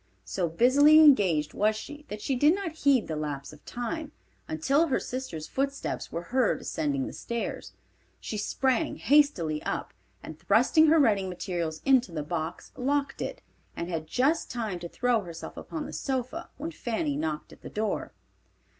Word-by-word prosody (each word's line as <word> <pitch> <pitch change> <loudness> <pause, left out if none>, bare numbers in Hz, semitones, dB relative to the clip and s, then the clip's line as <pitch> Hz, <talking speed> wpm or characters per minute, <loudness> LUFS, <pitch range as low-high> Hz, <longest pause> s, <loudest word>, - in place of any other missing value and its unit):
So 165 - -1
busily 275 - +6
engaged 195 - +5
was 215 +1 +2
she 295 +7 -8
that 210 0 -7
she 270 - 0
did 295 +7 +5
not 390 -4 -3
heed 280 -6 +2
the 160 - -3
lapse 145 -2 -4
of 150 - -16
time, 300 +5 -4 0.3
until 275 - +2
her 265 - +1
sister's 250 -12 -5
footsteps 275 - -3
were 170 - -4
heard 255 -3 +3
ascending 140 -3 -1
the - - -6
stairs. 235 -1 -4 0.5
She - - -5
sprang 260 +8 0
hastily 205 - +3
up, - - -3 0.3
and 155 -1 -9
thrusting 255 +10 +4
her 320 +2 +6
writing 205 -10 +3
materials 170 -3 -4
into 260 -7 +4
the 155 -3 -3
box 160 +1 -4
locked 280 +1 -1
it, - - -5 0.3
and 170 - -4
had 160 -2 -3
just 280 - +1
time 220 -7 -3
to 170 0 -7
throw 245 +1 +1
herself 170 -3 -8
upon 310 -2 -6
the - - -8
sofa 270 +5 -3
when 315 +4 -4
Fanny 220 - -2
knocked 155 +1 -3
at - - -17
the - - -8
door. 215 0 -2
230 Hz, 170 wpm, -28 LUFS, -, 0.5 s, busily